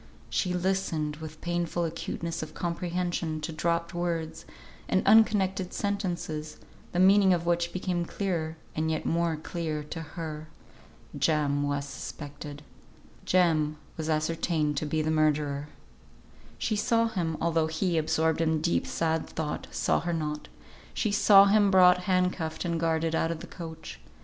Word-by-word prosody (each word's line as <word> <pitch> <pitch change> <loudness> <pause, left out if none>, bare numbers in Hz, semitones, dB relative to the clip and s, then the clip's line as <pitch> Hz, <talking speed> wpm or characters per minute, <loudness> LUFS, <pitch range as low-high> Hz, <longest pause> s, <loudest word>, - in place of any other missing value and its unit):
She 180 - 0
listened 175 -5 -1
with 155 0 -9
painful 175 0 -1
acuteness 165 0 -4
of 155 -1 -7
comprehension 175 -2 -2
to 150 - -4
dropped 170 +2 -1
words 170 -2 -3 0.4
and 190 - +2
unconnected 195 -4 +4
sentences, 175 -6 -3 0.3
the - - -3
meaning 190 0 +6
of 170 -1 -4
which 170 0 +1
became 180 -1 -2
clearer, 165 -5 -2 0.2
and 160 +1 0
yet 160 -1 -2
more 170 -1 +1
clear 155 -1 -4
to 160 +2 -6
her. 155 0 -6 0.7
Jem 145 -3 +1
was 145 0 -1
suspected. 145 0 -8 0.6
Jem 155 -4 +2 0.2
was 160 0 -4
ascertained 155 -1 0
to 155 - -1
be 155 +1 0
the 155 - 0
murderer. 150 -2 +1 0.9
She 215 - -1
saw 230 +2 +2
him 170 -7 -2
(although 165 -1 +1
he, 160 +1 0
absorbed 160 +1 +1
in 160 -1 +2
deep 170 +2 0
sad 160 -1 -1
thought, 155 -2 -4
saw - - +1
her 175 +1 -2
not), 150 -2 -3 0.5
she 215 - 0
saw 200 -1 +7
him 205 0 +4
brought 180 -1 +6
hand 185 -1 +2
cuffed 160 0 -4
and 170 -1 -1
guarded 165 0 0
out 165 0 +1
of 165 -1 -4
the - - -7
coach. 165 -2 -9
165 Hz, 150 wpm, -28 LUFS, 155-180 Hz, 0.9 s, saw